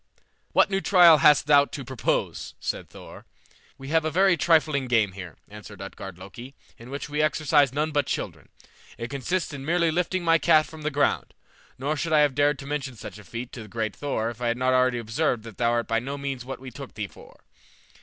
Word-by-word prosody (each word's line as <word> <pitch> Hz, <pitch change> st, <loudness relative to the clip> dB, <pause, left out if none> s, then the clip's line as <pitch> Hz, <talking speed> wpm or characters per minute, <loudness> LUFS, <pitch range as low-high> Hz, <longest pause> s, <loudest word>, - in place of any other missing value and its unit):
"What -, -, +3 dB
new 195 Hz, 0 st, 0 dB
trial 170 Hz, -3 st, +7 dB
hast 150 Hz, -3 st, +5 dB
thou 145 Hz, -1 st, +6 dB
to 140 Hz, -2 st, -8 dB
propose?" 130 Hz, -1 st, -2 dB
said -, -, -4 dB
Thor. -, -, -13 dB, 0.5 s
"We 135 Hz, 0 st, -9 dB
have 160 Hz, 0 st, +2 dB
a 160 Hz, -, 0 dB
very 190 Hz, +3 st, +3 dB
trifling 155 Hz, -4 st, +2 dB
game 115 Hz, -5 st, +2 dB
here," 90 Hz, -4 st, -10 dB
answered 105 Hz, -1 st, -12 dB
Utgard 95 Hz, -1 st, -8 dB
Loki, 115 Hz, +9 st, -11 dB, 0.2 s
"in 115 Hz, +2 st, -12 dB
which 140 Hz, +1 st, -5 dB
we 150 Hz, 0 st, -1 dB
exercise 150 Hz, -3 st, +3 dB
none 150 Hz, +3 st, -1 dB
but 145 Hz, -2 st, 0 dB
children. -, -, -5 dB, 0.5 s
It 115 Hz, +1 st, -6 dB
consists 155 Hz, +5 st, -2 dB
in 135 Hz, -1 st, -7 dB
merely 170 Hz, +2 st, +1 dB
lifting 180 Hz, +2 st, -1 dB
my 165 Hz, -1 st, +4 dB
cat 155 Hz, 0 st, +4 dB
from 160 Hz, -1 st, -12 dB
the 155 Hz, -, -1 dB
ground; 145 Hz, 0 st, 0 dB, 0.4 s
nor 145 Hz, +4 st, -2 dB
should 160 Hz, +1 st, -2 dB
I 150 Hz, -, +6 dB
have 145 Hz, -2 st, +3 dB
dared 145 Hz, +1 st, +2 dB
to 135 Hz, -, -9 dB
mention 140 Hz, -3 st, -4 dB
such 105 Hz, -, -9 dB
a -, -, -13 dB
feat 120 Hz, +5 st, -7 dB
to 120 Hz, -, -8 dB
the 110 Hz, -, -10 dB
great 110 Hz, 0 st, -3 dB
Thor 120 Hz, -6 st, -2 dB
if 120 Hz, +1 st, -14 dB
I 120 Hz, -, 0 dB
had 115 Hz, 0 st, 0 dB
not 130 Hz, +1 st, +1 dB
already 130 Hz, -1 st, +3 dB
observed 115 Hz, +1 st, -1 dB
that 115 Hz, -3 st, -12 dB
thou 120 Hz, -1 st, +2 dB
art 120 Hz, -1 st, 0 dB
by 115 Hz, 0 st, +1 dB
no 135 Hz, +4 st, -5 dB
means 135 Hz, -3 st, -4 dB
what 130 Hz, +1 st, -7 dB
we 130 Hz, 0 st, -9 dB
took 135 Hz, +2 st, -10 dB
thee 105 Hz, -, -3 dB
for." 95 Hz, -, -16 dB
140 Hz, 225 wpm, -25 LUFS, 115-155 Hz, 0.5 s, trial